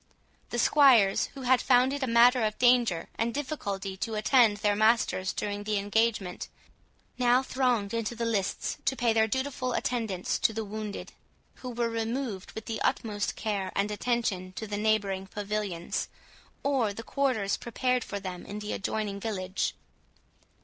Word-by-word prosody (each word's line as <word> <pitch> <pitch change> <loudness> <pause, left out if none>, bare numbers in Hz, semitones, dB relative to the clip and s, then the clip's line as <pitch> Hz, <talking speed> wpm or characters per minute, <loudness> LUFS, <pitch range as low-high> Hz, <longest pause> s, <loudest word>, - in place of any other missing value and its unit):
The 240 - -3
squires, 240 -6 +5
who 270 - -7
had 255 0 +4
found 255 +1 +4
it 285 - -3
a 265 - 0
matter 240 +2 +5
of 215 0 -1
danger 240 -9 +3
and 230 +1 +1
difficulty 205 -9 -4
to 220 +3 -3
attend 215 -1 +4
their 205 0 +1
masters 215 -3 +2
during 205 0 -3
the 210 0 0
engagement, 205 -2 0 0.7
now 250 +1 +4
thronged 250 -6 0
into 230 0 -2
the 230 0 -2
lists 205 -4 -1
to 265 - +1
pay 240 -2 +2
their 220 0 +3
dutiful 260 +1 -2
attendance 220 -9 -1
to 220 - +2
the 220 0 -3
wounded, 210 0 -6 0.4
who 255 - -7
were 235 -1 -1
removed 230 -3 -3
with 220 - -7
the 225 -1 -4
utmost 205 -2 -1
care 200 -4 -2
and 200 +1 0
attention 210 -5 -1
to 220 - -5
the 205 -1 -4
neighbouring 205 -3 0
pavilions, 205 -4 -3 0.6
or 275 -5 +2
to 200 - -6
the 225 - -6
quarters 250 -7 0
prepared 250 +1 -1
for 200 - -5
them 185 -2 -6
in 205 - -6
the 210 0 -4
adjoining 205 0 -3
village. 195 -3 -2
220 Hz, 165 wpm, -28 LUFS, 200-245 Hz, 0.7 s, squires